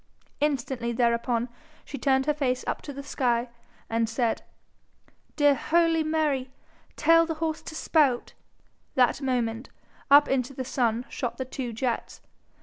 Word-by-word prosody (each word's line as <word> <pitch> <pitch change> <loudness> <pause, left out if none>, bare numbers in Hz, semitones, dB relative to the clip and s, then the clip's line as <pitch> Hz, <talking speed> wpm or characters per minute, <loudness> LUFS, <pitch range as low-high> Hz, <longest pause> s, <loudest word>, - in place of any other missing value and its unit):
Instantly 265 -4 -1
thereupon 235 0 +1 0.4
she 280 - -7
turned 265 -1 +2
her 300 - +2
face 260 -3 -1
up - - -2
to 290 - -7
the 280 0 -7
sky, 245 -3 0 0.4
and 230 0 0
said, 230 0 0 0.9
'Dear 290 -1 +5
holy 330 +2 +2
Mary, 305 -4 0 0.5
tell 330 +1 +5
horse 320 -1 -2
to 315 - -9
spout.' 290 -6 +2 0.6
That 255 +2 +3
moment 245 -2 -1 0.4
up 290 +1 +8
into 265 0 -1
the 260 - -4
sun 240 -2 0
shot 245 -3 -4
the 260 - -3
two 255 -1 -5
jets. 235 +1 -3
265 Hz, 140 wpm, -27 LUFS, 240-295 Hz, 0.9 s, up